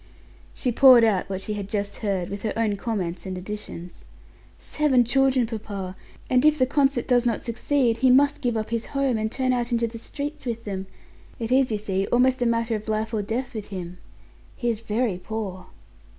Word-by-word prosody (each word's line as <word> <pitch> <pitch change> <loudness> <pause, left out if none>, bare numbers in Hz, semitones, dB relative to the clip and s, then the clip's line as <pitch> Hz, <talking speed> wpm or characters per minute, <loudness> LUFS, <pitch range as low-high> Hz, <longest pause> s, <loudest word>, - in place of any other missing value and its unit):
She 250 - -1
poured 250 -1 +8
out 205 -4 +2
what 190 -1 -3
she 210 - -3
had 205 -1 -5
just 205 -1 -2
heard, 195 -5 -2
with 200 0 -4
her 215 - -2
own 220 -3 +1
comments 195 -4 -3
and 185 -1 -4
additions. 180 -2 -7 0.5
"Seven 280 -5 +2
children, 265 0 +3
papa! 205 -4 -6 0.3
And 250 0 +3
if 305 0 +5
the 255 - +4
concert 270 -2 +1
does 245 -2 +3
not 235 -3 -1
succeed 235 0 +1
he 260 +2 +3
must 285 +3 +4
give 240 -4 0
up 215 0 -4
his 230 -1 -1
home, 265 -5 +1
and 220 0 -2
turn 255 -1 0
out 240 0 -1
into 235 0 +2
the 230 0 -6
streets 290 +5 -5
with 230 -1 -3
them 190 -2 -4 0.5
it 230 0 -4
is, 260 -1 +3
you 215 - +1
see, 195 -2 -1
almost 255 +1 +3
a 245 - +3
matter 230 0 +1
of 215 0 -6
life 220 +1 -1
or 215 - 0
death 235 +5 -3
with 215 -3 -6
him. 180 -2 -7 0.6
He 240 -2 0
is 220 -1 -5
very 220 -3 -1
poor." 195 -2 -5
225 Hz, 205 wpm, -24 LUFS, 205-250 Hz, 0.6 s, poured